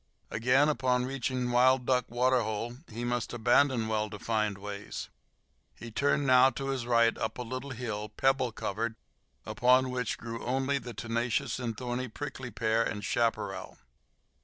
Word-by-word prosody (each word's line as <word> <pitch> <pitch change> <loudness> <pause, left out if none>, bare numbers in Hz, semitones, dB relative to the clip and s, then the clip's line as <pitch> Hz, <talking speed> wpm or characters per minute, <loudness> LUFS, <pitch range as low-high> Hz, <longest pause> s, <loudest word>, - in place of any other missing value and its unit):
Again, 125 +6 +3
upon 125 -4 +1
reaching 130 -1 -2
Wild 125 +1 +4
Duck 125 -1 +2
Waterhole, 120 -2 0
must 120 +1 -2
he - - -5
abandon 120 0 +3
well 110 -1 0
defined 105 -1 -1
ways. 100 0 -6 0.7
He 115 - -9
turned 145 +4 +1
now 130 0 +7
to 135 0 -5
his 130 -3 -2
right 115 -1 +4
up - - -2
a 125 - -3
little 130 +3 -5
hill, 110 -4 -4
pebble 130 +2 +1
covered, 110 +2 -3 0.5
upon 125 +1 +3
which 125 -3 -2
grew 115 0 -6
only 135 +2 0
the 120 -3 -8
tenacious 120 +2 -1
and 115 -3 -3
thorny 125 +1 -3
prickly 130 +1 -6
pear 110 +1 +1
and 105 -3 -3
chaparral. 115 0 -1
120 Hz, 150 wpm, -30 LUFS, 115-130 Hz, 0.7 s, now